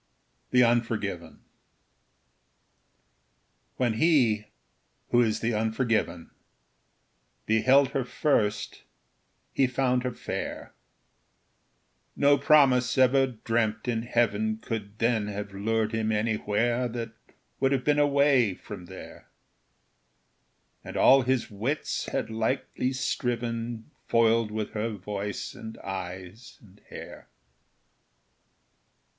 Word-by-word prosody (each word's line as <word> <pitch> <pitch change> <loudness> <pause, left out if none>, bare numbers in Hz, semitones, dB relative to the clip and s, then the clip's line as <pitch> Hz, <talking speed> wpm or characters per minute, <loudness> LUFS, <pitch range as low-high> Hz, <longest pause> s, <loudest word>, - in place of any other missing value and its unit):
The 125 0 +5
Unforgiven 115 -7 -1 2.4
When 120 -3 +1
he, 115 -6 +2 0.6
who 120 - +5
is 110 -2 0
the 115 +1 0
unforgiven, 110 -4 -1 1.1
Beheld 130 +5 +4
her 135 -1 -1
first, 115 -5 -1 0.7
he 135 - +3
found 125 0 +1
her 125 0 -2
fair: 120 - -6 1.4
No 145 0 +5
promise 135 -5 +4
ever 130 +1 +4
dreamt 115 -2 -2
in 115 -2 0
heaven 110 -2 0
Could 110 -2 -6
then 115 -2 +1
have 105 0 -6
lured 110 +2 -1
him 110 -1 -1
anywhere 110 +3 0
That 115 -1 -5 0.5
would 135 0 +2
have 135 -2 +1
been 150 0 +2
away 140 -7 +3
from 100 -3 -10
there; 95 +1 -12 1.5
And - - -7
all 135 +1 +6
his 130 -2 -1
wits 120 +9 -2
had - - -3
lightly 125 +3 -1
striven, 120 -1 -3 0.2
Foiled 115 -1 +3
with 110 0 -4
her 110 +1 -2
voice, 105 -1 -5
and 110 0 -9
eyes, 95 +3 -7
and 105 -1 -20
hair. - - -10
115 Hz, 100 wpm, -27 LUFS, 105-125 Hz, 2.4 s, all